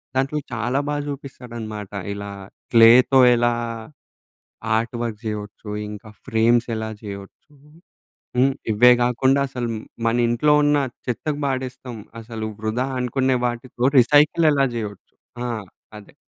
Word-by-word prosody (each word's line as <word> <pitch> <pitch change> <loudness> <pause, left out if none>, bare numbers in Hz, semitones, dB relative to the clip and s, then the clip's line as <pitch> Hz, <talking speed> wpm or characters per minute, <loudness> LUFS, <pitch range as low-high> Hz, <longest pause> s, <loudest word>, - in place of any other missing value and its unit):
దాంట్లో 140 +3 0
చాలా 120 +4 -1
బాగా 145 0 -1
చూపిస్తాడనమాట. 120 -7 -7 0.2
ఇలా 100 0 -6 0.4
క్లేతో 120 +3 +7 0.2
ఎలా 120 0 +2 1.2
ఆర్ట్‌వర్క్ 115 -1 -3
చేయొచ్చు 105 0 -6 0.2
ఇంకా 105 +1 -9 0.2
ఫ్రేమ్స్ 115 +2 +2
ఎలా 110 0 -4
చేయొచ్చు. 100 +7 -10 0.9
హ్మ్. 135 +2 +4 0.2
ఇవే 120 +4 +6
గాకుండా 130 +3 +2
అసలు 125 -2 -4 0.4
మనింట్లో 120 +5 +2
ఉన్న 145 0 +3 0.3
చెత్తకు 145 +5 -2
పాడేస్తం. 130 -2 -4 0.3
అసలు 110 -1 -6
వృధా 110 +4 -1
అనుకునే 130 +1 +1
వాటితో 120 0 -4
రీసైకిల్ 150 +6 +5
ఎలా 140 -1 +3
చేయొచ్చు? 105 -4 -7 0.3
ఆ! - - -3 0.5
అదె. 100 - -17
120 Hz, 110 wpm, -22 LUFS, 110-130 Hz, 1.2 s, క్లేతో